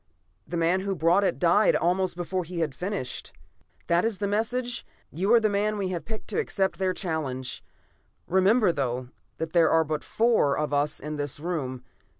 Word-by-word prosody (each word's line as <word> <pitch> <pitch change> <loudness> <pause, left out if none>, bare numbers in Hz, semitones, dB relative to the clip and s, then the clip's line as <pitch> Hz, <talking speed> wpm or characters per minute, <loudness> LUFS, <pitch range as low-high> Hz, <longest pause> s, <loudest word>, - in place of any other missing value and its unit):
The 175 - -3
man 170 +3 +2
who 195 0 -2
brought 170 +5 +3
it - - +1
died 180 +4 +4
almost 180 +1 +1
before 180 +1 -2
he 170 0 -5
had 155 -4 -1
finished. 180 -3 -4 0.5
"That 170 +1 +2
is 225 -3 0
the 205 - -2
message. 240 +4 -1 0.3
You 190 +8 0
are - - +7
the 220 - +2
man 210 +1 0
we 195 -2 -1
have 175 -2 -4
picked 220 -1 -7
to - - -1
accept 195 - -1
their 190 -1 +1
challenge. 155 -9 -3 0.6
Remember, 190 +3 +4
though, 125 -4 -2 0.3
that 160 0 -4
there 170 -2 +5
are 160 0 +4
but 155 -1 -3
the - - -15
four 225 -11 +2
of 150 -1 -1
us 145 +1 0
in 150 +1 -5
this 145 -1 -4
room. 140 -7 -3
175 Hz, 190 wpm, -26 LUFS, 155-200 Hz, 0.6 s, are